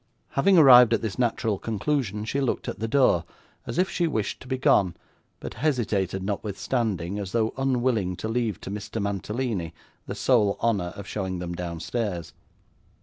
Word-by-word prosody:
Having 185 Hz, +7 st, +3 dB
arrived 125 Hz, -6 st, +8 dB
at -, -, -4 dB
this 110 Hz, +1 st, -4 dB
natural 115 Hz, -4 st, 0 dB
conclusion, 110 Hz, -2 st, -2 dB
she 140 Hz, +5 st, -1 dB
looked 135 Hz, -, -1 dB
at -, -, -5 dB
the 115 Hz, -, -2 dB
door, 115 Hz, -, +3 dB, 0.4 s
as -, -, -4 dB
if 185 Hz, +1 st, +3 dB
she 175 Hz, -2 st, 0 dB
wished 110 Hz, -9 st, -2 dB
to -, -, -12 dB
be 130 Hz, 0 st, -1 dB
gone, 95 Hz, -8 st, +3 dB, 0.4 s
but -, -, -7 dB
hesitated 110 Hz, -, -1 dB
notwithstanding, 100 Hz, -1 st, -2 dB
as 95 Hz, -2 st, -6 dB
though 115 Hz, -1 st, +1 dB
unwilling 125 Hz, -8 st, 0 dB
to 110 Hz, -, -5 dB
leave 115 Hz, -2 st, -1 dB
to -, -, -6 dB
Mr 105 Hz, +2 st, -5 dB
Mantalini 100 Hz, -2 st, -3 dB, 0.3 s
the -, -, -4 dB
sole 105 Hz, -6 st, +2 dB
honour 100 Hz, -7 st, 0 dB
of 100 Hz, -, -8 dB
showing 95 Hz, -2 st, -3 dB
them 90 Hz, 0 st, -4 dB
downstairs. 90 Hz, +2 st, -4 dB
110 Hz, 165 wpm, -26 LUFS, 95-125 Hz, 0.4 s, arrived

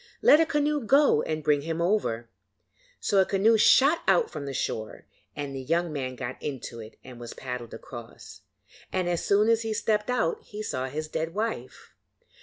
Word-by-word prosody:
'Let 300 Hz, -, +7 dB
a 325 Hz, -, +3 dB
canoe 295 Hz, 0 st, +1 dB
go 275 Hz, -, +4 dB
and 155 Hz, -1 st, -3 dB
bring 150 Hz, -1 st, +2 dB
him 165 Hz, +2 st, -3 dB
over.' 170 Hz, -, 0 dB, 0.7 s
So 200 Hz, -, +2 dB
a -, -, +7 dB
canoe 205 Hz, +4 st, +3 dB
shot 275 Hz, +8 st, +5 dB
out 465 Hz, -, +3 dB
from 140 Hz, -, -6 dB
the -, -, -3 dB
shore, 110 Hz, -4 st, -4 dB, 0.3 s
and 140 Hz, -2 st, -5 dB
the 135 Hz, -, -4 dB
young 165 Hz, +4 st, 0 dB
man 130 Hz, -3 st, -4 dB
got 125 Hz, 0 st, -6 dB
into 130 Hz, -4 st, -6 dB
it 110 Hz, 0 st, -11 dB
and 125 Hz, -2 st, -11 dB
was 120 Hz, -1 st, -8 dB
paddled 125 Hz, -3 st, -6 dB
across, 115 Hz, -5 st, -11 dB, 0.5 s
and 185 Hz, -1 st, -1 dB
as 175 Hz, -1 st, -1 dB
soon 205 Hz, +2 st, +3 dB
as 230 Hz, 0 st, +3 dB
he 220 Hz, -1 st, -2 dB
stepped 210 Hz, +1 st, 0 dB
out 235 Hz, -10 st, 0 dB
he 210 Hz, +1 st, -8 dB
saw 130 Hz, -8 st, -3 dB
his 155 Hz, +4 st, -4 dB
dead 160 Hz, +2 st, -4 dB
wife. 210 Hz, -, -4 dB
160 Hz, 190 wpm, -27 LUFS, 130-215 Hz, 0.7 s, Let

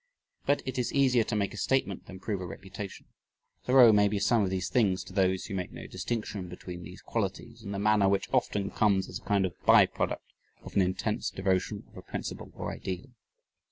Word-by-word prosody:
But 145 Hz, -, +2 dB
it 130 Hz, 0 st, -3 dB
is 125 Hz, -1 st, 0 dB
easier 130 Hz, -4 st, +4 dB
to 110 Hz, -, -2 dB
make 100 Hz, -2 st, 0 dB
a -, -, -8 dB
statement 115 Hz, -8 st, 0 dB
than 95 Hz, -1 st, -9 dB
prove 100 Hz, -1 st, -3 dB
a 90 Hz, -, -4 dB
reputation. 95 Hz, +2 st, -8 dB, 0.6 s
Thoreau 125 Hz, -3 st, +8 dB
may 105 Hz, 0 st, +5 dB
be 100 Hz, +1 st, -1 dB
some 110 Hz, +3 st, +3 dB
of 95 Hz, -, 0 dB
these 95 Hz, -1 st, -1 dB
things 95 Hz, -6 st, +2 dB
to 95 Hz, -, -12 dB
those 95 Hz, -1 st, +2 dB
who 105 Hz, -, -6 dB
make 90 Hz, -2 st, -3 dB
no -, -, -9 dB
distinction 95 Hz, -1 st, -4 dB
between 90 Hz, 0 st, -8 dB
these 90 Hz, +2 st, -11 dB
qualities 115 Hz, +2 st, -3 dB
and 100 Hz, -2 st, -6 dB
the 100 Hz, -, -3 dB
manner 105 Hz, -1 st, +4 dB
which 100 Hz, 0 st, +1 dB
often 100 Hz, -1 st, +1 dB
comes 100 Hz, -3 st, +2 dB
as -, -, -6 dB
a -, -, -23 dB
kind 100 Hz, -2 st, +2 dB
of 90 Hz, -, -3 dB
by -, -, +8 dB
product -, -, -3 dB, 0.4 s
of -, -, -10 dB
an 100 Hz, -, +5 dB
intense 95 Hz, 0 st, 0 dB
devotion 95 Hz, -1 st, -1 dB
of -, -, -17 dB
a -, -, -7 dB
principle -, -, -6 dB
or -, -, -4 dB
ideal. 95 Hz, +8 st, -5 dB
100 Hz, 215 wpm, -29 LUFS, 95-110 Hz, 0.6 s, Thoreau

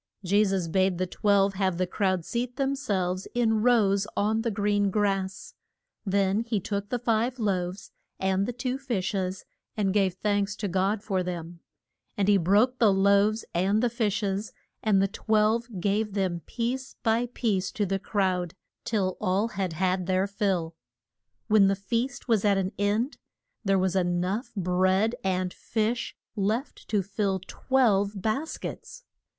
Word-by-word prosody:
Je 200 Hz, +3 st, +3 dB
sus 190 Hz, -4 st, 0 dB
bade 185 Hz, +1 st, +1 dB
the 185 Hz, -, 0 dB
twelve 200 Hz, +1 st, +2 dB
have 190 Hz, -2 st, 0 dB
the 185 Hz, -, +1 dB
crowd 185 Hz, -2 st, 0 dB
seat 245 Hz, +1 st, -3 dB
them 275 Hz, 0 st, 0 dB
selves 190 Hz, -8 st, -2 dB
in 225 Hz, -3 st, +2 dB
rows 205 Hz, -4 st, +3 dB
on 215 Hz, +2 st, +1 dB
the 230 Hz, -, -1 dB
green 205 Hz, -1 st, +1 dB
grass. 195 Hz, -2 st, -1 dB, 0.5 s
Then 195 Hz, +1 st, +2 dB
he 230 Hz, -2 st, -1 dB
took 200 Hz, +1 st, -4 dB
the 245 Hz, -, 0 dB
five 235 Hz, +1 st, 0 dB
loaves 190 Hz, -4 st, -2 dB, 0.3 s
and 190 Hz, +1 st, +1 dB
the -, -, -1 dB
two 250 Hz, +2 st, -3 dB
fish 235 Hz, -10 st, -2 dB
es, 185 Hz, -1 st, -3 dB, 0.3 s
and 195 Hz, -3 st, +1 dB
gave 195 Hz, -3 st, +2 dB
thanks 205 Hz, +1 st, 0 dB
to 205 Hz, -, -3 dB
God 195 Hz, +3 st, 0 dB
for 195 Hz, -4 st, 0 dB
them. 175 Hz, -1 st, -5 dB, 0.6 s
And 200 Hz, -1 st, +1 dB
he 205 Hz, -1 st, +6 dB
broke 205 Hz, +8 st, +3 dB
the 220 Hz, -4 st, +5 dB
loaves, 200 Hz, +3 st, +3 dB
and 195 Hz, +6 st, +2 dB
the 240 Hz, -, +2 dB
fish 220 Hz, -2 st, 0 dB
es, 200 Hz, +2 st, -2 dB, 0.3 s
and 200 Hz, -3 st, +3 dB
the -, -, +2 dB
twelve 220 Hz, +3 st, +1 dB
gave 205 Hz, +2 st, 0 dB
them 185 Hz, -3 st, 0 dB
piece 255 Hz, +3 st, -3 dB
by 230 Hz, +1 st, +2 dB
piece 195 Hz, -5 st, 0 dB
to 210 Hz, -, 0 dB
the 195 Hz, 0 st, -1 dB
crowd, 185 Hz, -4 st, -1 dB, 0.3 s
till 190 Hz, -5 st, 0 dB
all 200 Hz, +3 st, +1 dB
had 190 Hz, -5 st, -3 dB
had 185 Hz, +1 st, 0 dB
their 185 Hz, 0 st, +2 dB
fill. 195 Hz, -5 st, -1 dB, 0.7 s
When 210 Hz, -3 st, +5 dB
the 195 Hz, -, +2 dB
feast 235 Hz, +7 st, -3 dB
was 225 Hz, -5 st, +2 dB
at 200 Hz, -2 st, +3 dB
an 190 Hz, 0 st, -1 dB
end 210 Hz, +7 st, 0 dB, 0.5 s
there 195 Hz, -2 st, +2 dB
was 185 Hz, 0 st, +1 dB
e 190 Hz, -, +4 dB
nough 180 Hz, +7 st, -1 dB
bread 185 Hz, +3 st, +2 dB
and 185 Hz, -1 st, -1 dB
fish 230 Hz, +2 st, -2 dB, 0.2 s
left 215 Hz, +6 st, -2 dB
to 205 Hz, -3 st, +1 dB
fill 195 Hz, 0 st, -1 dB
twelve 210 Hz, -6 st, +1 dB
bas 225 Hz, -, -2 dB
kets. -, -, -8 dB
200 Hz, 165 wpm, -27 LUFS, 190-220 Hz, 0.7 s, he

